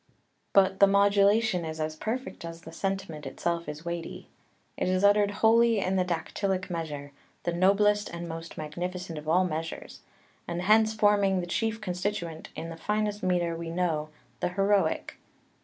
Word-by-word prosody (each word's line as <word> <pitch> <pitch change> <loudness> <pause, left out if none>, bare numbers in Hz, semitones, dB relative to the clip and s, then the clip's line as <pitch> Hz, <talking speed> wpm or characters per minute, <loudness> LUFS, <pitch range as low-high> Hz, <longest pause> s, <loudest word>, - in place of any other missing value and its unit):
But 195 -1 +4
the 200 - +8
modulation 200 0 +3
is 160 0 -5
as 155 0 -2
perfect 230 +8 -4
as 165 0 -7
the 160 - -10
sentiment 190 -5 -3
itself 170 +5 -2
is 150 +3 -8
weighty. 170 -1 -5 0.5
It - - -1
is 185 +1 +1
uttered 205 0 +5
wholly 225 +2 +4
in 190 -1 0
the 185 - +3
dactylic 185 +2 -2
measure, 150 -4 -4 0.3
the 175 - -1
noblest 205 +3 +3
and 170 0 -6
most 165 0 -7
magnificent 175 +2 -5
of 155 +1 -7
all 180 +3 +4
measures, 165 -1 -5 0.5
and 175 +1 -3
hence 220 +2 +4
forming 205 -3 +3
the 175 - -2
chief 225 +5 -1
constituent 180 -4 -3
in 165 - -5
the 165 - -8
finest 210 +3 -1
metre 175 -2 +1
we 165 0 -5
know, 165 -3 -1 0.3
the - - 0
heroic. 195 +2 +1
180 Hz, 160 wpm, -28 LUFS, 165-205 Hz, 0.5 s, the